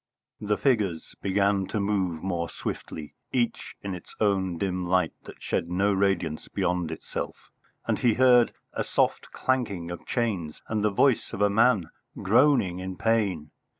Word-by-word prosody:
The 105 0 0
figures 105 - 0
began 100 0 +1
to 110 - -2
move 95 -5 -1
more 85 -3 -2
swiftly, 75 -2 -6 0.2
each 120 -2 -1
in 100 -1 -3
its 90 - -10
own 95 -4 +1
dim 90 -1 -2
light 90 +1 +2
that - - -12
shed 85 - -1
no 100 +3 +2
radiance 95 -5 0
beyond 90 -2 -1
itself, - - -6 0.3
and - - 0
he 120 -3 +3
heard 125 -2 +5 0.2
a - - -1
soft - - 0
clanking 100 -10 -1
of 85 - -8
chains 95 -10 -1
and 110 -1 -1
the 105 - +4
voice 115 +4 +2
of 100 - -4
a 100 - +4
man 110 -5 +3 0.3
groaning 110 -4 +3
in 95 0 -5
pain. 100 -9 0
100 Hz, 155 wpm, -27 LUFS, 90-110 Hz, 0.3 s, heard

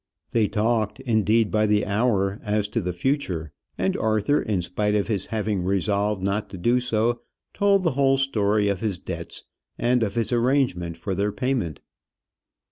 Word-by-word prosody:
They 110 -3 +2
talked, 110 +1 0
indeed, 110 -3 +2
by 110 0 +2
the 105 0 +2
hour 100 -1 +1
as 105 -1 0
to 115 - -1
the 90 -1 -2
future; 90 - -2 0.3
and - - 0
Arthur, 110 +6 +1
in 100 -5 -1
spite 105 +4 -1
of 105 - +1
his 100 -4 -2
having 105 -3 -1
resolved 100 +2 0
not 100 +2 -1
to 95 - -8
do 120 +8 +2
so, 120 -1 0 0.3
told 200 -1 +3
the 165 - +2
whole 135 0 +3
story 105 -6 +1
of 100 -2 0
his 105 -4 -1
debts, - - -6 0.3
and 125 +1 +2
of 100 -3 -1
his 115 +1 0
arrangement 120 - +1
for 90 +4 -3
their 100 +2 0
payment. 120 - -2
105 Hz, 170 wpm, -24 LUFS, 100-120 Hz, 0.3 s, told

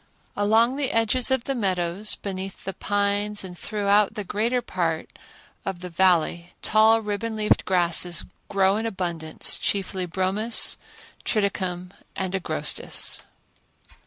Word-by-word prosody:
Along 225 +5 +3
the 285 -2 0
edges 230 +3 +3
of 265 -2 +1
the 275 - -2
meadows 190 -3 0
beneath 195 -1 -6
the 195 - -4
pines 205 +1 0
and 180 -2 -7
throughout 205 +3 +1
the 210 - -3
greater 225 +6 0
part 170 -8 -2 0.5
of 190 -2 -4
the 180 -1 -7
Valley 175 -1 +2
tall 220 +1 +5
ribbon 210 +2 -3
leaved 215 -1 +2
grasses 175 -1 +1 0.2
grow 195 0 +3
in 225 +1 -2
abundance, 170 -6 -1
chiefly 190 -2 -1
bromus, 190 +6 +3 0.5
triticum 185 -4 -1 0.2
and 190 -1 -3
agrostis. 155 -5 -1
195 Hz, 125 wpm, -24 LUFS, 180-215 Hz, 0.5 s, tall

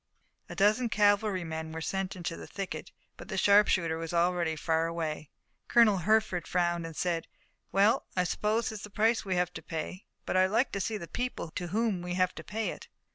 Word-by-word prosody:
A - - -7
dozen 215 +4 +3
cavalrymen 195 -7 +1
were 160 - -5
sent 190 +4 -2
into 170 -2 -4
the - - -9
thicket, 195 -2 -6 0.3
but - - -10
the - - -4
sharpshooter 185 -5 +4
was 165 +1 -4
already 170 -1 +2
far 160 +1 +1
away. 160 -3 -4 0.4
Colonel 225 -4 +5
Hertford 215 -1 +1
frowned 175 -1 0
and 165 - -9
said: 170 -1 -1 0.4
"Well, 200 +4 +3
I 180 - +4
suppose 215 +5 0
it's 215 -2 -7
the 210 - -8
price 225 +3 +2
we 190 -3 -1
have 180 0 0
to - - -7
pay, 165 +4 -5 0.2
but - - -2
I'd 185 0 +5
like 230 +7 +1
to 200 - -2
see 215 +3 -1
the 170 -4 -8
people 245 -9 -4
to 175 - -4
whom 210 -1 0
we 180 0 -4
have 185 0 +2
to - - -9
pay 220 +1 -2
it." - - -10
185 Hz, 200 wpm, -30 LUFS, 170-210 Hz, 0.4 s, Colonel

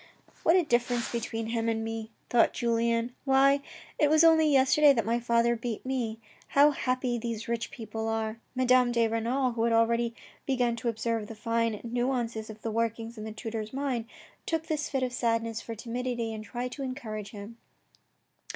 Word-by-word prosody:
What 330 - +4
a 370 - +5
difference 240 -4 0
between 225 -1 -3
him 230 0 0
and 225 0 -1
me, 225 0 -4 0.2
thought 240 - +4
Julien. 235 0 0
Why, 275 +1 +4 0.4
it 295 - +4
was 310 +1 +5
only 320 -2 +6
yesterday 280 +2 +6
that 230 -5 0
my 230 +2 +1
father 235 0 +2
beat 235 -1 -5
me. 240 -4 -2 0.4
How 290 +1 +8
happy 255 -3 -1
these 225 -1 -4
rich 230 -1 -2
people 225 -1 -5
are. 225 0 -2 0.2
Madame 255 -1 +4
de 235 -1 +3
Renal, 240 +4 0
who 230 -1 -3
had 230 0 +2
already 230 +1 +2 0.3
begun 250 -3 +1
to 235 0 -1
observe 225 -1 -2
the 225 - -8
fine 230 0 0
nuances 235 -2 -2
of 215 0 -10
the 225 - -2
workings 230 +1 -2
in 215 -1 -7
the 220 - -5
tutor's 220 0 -5
mind, 265 -4 -1 0.4
took 320 -1 -1
this 305 -2 -2
fit 270 -2 -1
of 250 -1 -2
sadness 230 -2 0
for 230 - -6
timidity 235 0 -3
and 215 -1 -6
tried 245 +3 -4
to 275 - -7
encourage 230 -6 -5
him. 210 +2 -9
235 Hz, 180 wpm, -29 LUFS, 225-255 Hz, 0.4 s, How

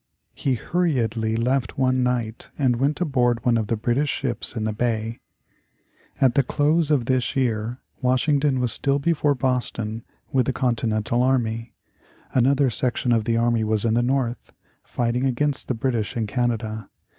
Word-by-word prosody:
He 135 -2 0
hurriedly 115 - 0
left 125 +3 0
one 130 -1 +2
night 120 -3 -2
and 130 -4 +2
went 140 +4 0
aboard 125 -7 +1
one 120 -1 +4
of 110 -2 0
the 115 - 0
British 120 +7 0
ships 125 -4 -3
in 110 - -2
the 110 0 -1
bay. 115 0 -2 1.0
At 130 -3 +4
the 140 - +4
close 150 +4 +1
of 140 -6 +2
this 130 0 0
year 120 -2 0 0.2
Washington 135 +2 +2
was 125 -2 0
still 140 0 +1
before 145 -1 +1
Boston 115 -3 -2 0.3
with 130 -2 +2
the 135 - +1
Continental 115 -2 0
army. 115 -3 0 0.6
Another 135 +1 +3
section 125 +1 0
of 115 -2 +2
the 115 0 +1
army 115 -1 +2
was 110 0 0
in 110 - +2
the 120 - +3
North, 125 -1 -1 0.3
fighting 120 +1 -1
against 135 +2 0
the 125 - -1
British 115 -2 -1
in 115 - 0
Canada. 110 -2 -2
125 Hz, 160 wpm, -23 LUFS, 115-135 Hz, 1.0 s, one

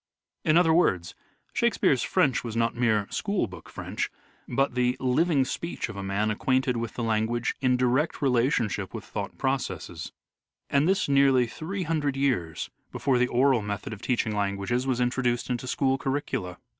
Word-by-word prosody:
In 155 +1 +4
other 165 -2 +5
words, 90 - +2 0.4
Shakespeare's - - +2
French 130 - +2
was 115 -2 -5
not 115 0 +1
mere 110 -4 +2
school 200 -2 0
book 90 -3 -11
French, - - -4 0.4
but 135 +2 +1
the 125 +1 +1
living 135 +2 +2
speech 170 -2 -4
of 110 - -7
a 100 - -5
man 100 +2 0
acquainted 130 +3 +1
with 115 -1 -4
the 120 - -3
language 115 +2 0
in 130 -2 +3
direct 130 +5 +1
relationship 120 -7 +1
with 110 - -6
thought 100 -2 -5
processes: 105 - -3 0.6
and 140 +3 +3
this 190 +1 +2
nearly 135 -3 +4
three 180 - -4
hundred 150 -4 -1
years 115 - -1 0.2
before 130 -3 +1
the 125 - +3
oral 125 0 +3
method 105 +4 -4
of 100 - -9
teaching 115 -4 0
languages 100 +5 -1
was 130 -2 0
introduced 125 0 0
into 125 +1 -3
school 135 +1 +1
curricula. 135 -11 -2
125 Hz, 165 wpm, -27 LUFS, 110-135 Hz, 0.6 s, other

